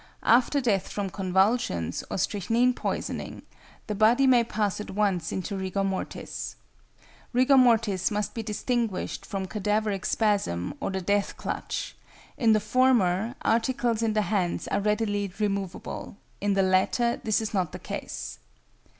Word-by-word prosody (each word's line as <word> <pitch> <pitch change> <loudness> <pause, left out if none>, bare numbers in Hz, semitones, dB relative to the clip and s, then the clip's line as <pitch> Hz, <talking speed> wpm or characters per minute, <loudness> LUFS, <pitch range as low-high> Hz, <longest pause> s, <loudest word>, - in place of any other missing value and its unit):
After 250 +4 +4
death 215 -8 +1
from 200 -2 -3
convulsions 190 - +1
or - - -3
strychnine 225 +6 +1
poisoning, - - -4 0.4
the 215 - -3
body 225 +6 +4
may 250 -3 +5
pass 210 -3 -1
at - - -8
once 190 -5 0
into 190 +2 -3
rigor 190 +1 -2
mortis. 195 -1 -4 0.8
Rigor 255 +3 +5
mortis 225 -7 +4
must 210 -1 -2
be 230 - -3
distinguished 220 -1 -2
from 195 -2 -3
cadaveric 210 0 -1
spasm 200 - 0
or - - -2
the 190 0 -2
death 200 +2 0
clutch; - - -4 0.4
in 225 -3 +4
the 215 - +4
former, 225 -2 +2
articles 235 0 +1
in 225 -1 +1
the 215 0 +2
hands 190 -5 -1
are - - +1
readily 205 -1 0
removable, 200 -2 -3 0.2
in 200 0 +1
the 195 - +3
latter 190 +6 +2
this 215 -2 +2
is 220 -1 -4
not 185 -5 0
the - - -6
case. - - -6
210 Hz, 145 wpm, -27 LUFS, 195-230 Hz, 0.8 s, may